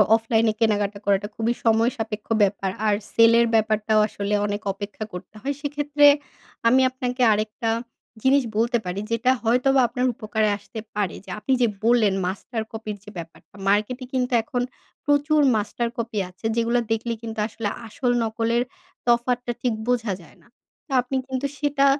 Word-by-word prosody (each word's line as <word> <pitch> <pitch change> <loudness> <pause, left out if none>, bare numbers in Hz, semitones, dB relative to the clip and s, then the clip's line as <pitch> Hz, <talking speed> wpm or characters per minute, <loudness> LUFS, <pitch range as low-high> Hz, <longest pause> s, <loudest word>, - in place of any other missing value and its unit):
অফলাইনে 225 -1 +2
কেনাকাটা 205 -2 +1
করাটা 200 0 +2
খুবই 230 +1 0
সময়সাপেক্ষ 225 -1 +1 0.2
ব্যাপার। 195 -1 0 0.2
আর 210 - +4 0.2
সেলের 230 +1 +6
ব্যাপারটাও 215 0 +2
আসলে 200 -1 -3
অনেক 205 +1 -3
অপেক্ষা 205 +2 -6
করতে 180 +3 -9
হয় 280 +5 -1
সেক্ষেত্রে 290 0 +2 0.6
আমি 255 +3 +5
আপনাকে 255 0 -3
আরেকটা 215 +3 -2 0.5
জিনিস 270 +1 +4
বলতে 235 +2 +2
পারি, 180 +2 -3
যেটা 230 +3 +3
হয়তোবা 255 +4 +3
আপনার 250 +2 -1
উপকারে 215 -1 0
আসতে 210 +2 -9 0.2
পারে। 205 -4 -1
যে - - -13
আপনি 265 - 0
যে 240 - +5 0.2
বললেন 230 -3 +4
মাস্টার 210 +5 -3
কপির 220 -1 -5
যে 210 - -11
ব্যাপারটা 165 +2 -10
মার্কেটে 215 +6 +1
কিন্তু 255 0 0
এখন 245 +1 -2 0.4
প্রচুর 290 +1 +3 0.2
মাস্টার 220 +3 -1
কপি 230 -2 -2
আছে 185 +4 -14
যেগুলো 235 +1 +2
দেখলে 225 +1 0
কিন্তু 225 -1 -6
আসলে 225 -1 -3 0.2
আসল 245 +3 -1
নকলের 230 +2 0 0.4
তফাৎটা 240 +1 +2
ঠিক 245 -2 +1
বোঝা 235 -5 +1
যায় 165 - -18
না। - - -24 0.4
তো - - -15
আপনি 250 +2 -5
কিন্তু 265 +1 -2
সেটা 290 -1 +2
230 Hz, 155 wpm, -24 LUFS, 210-250 Hz, 0.6 s, সেলের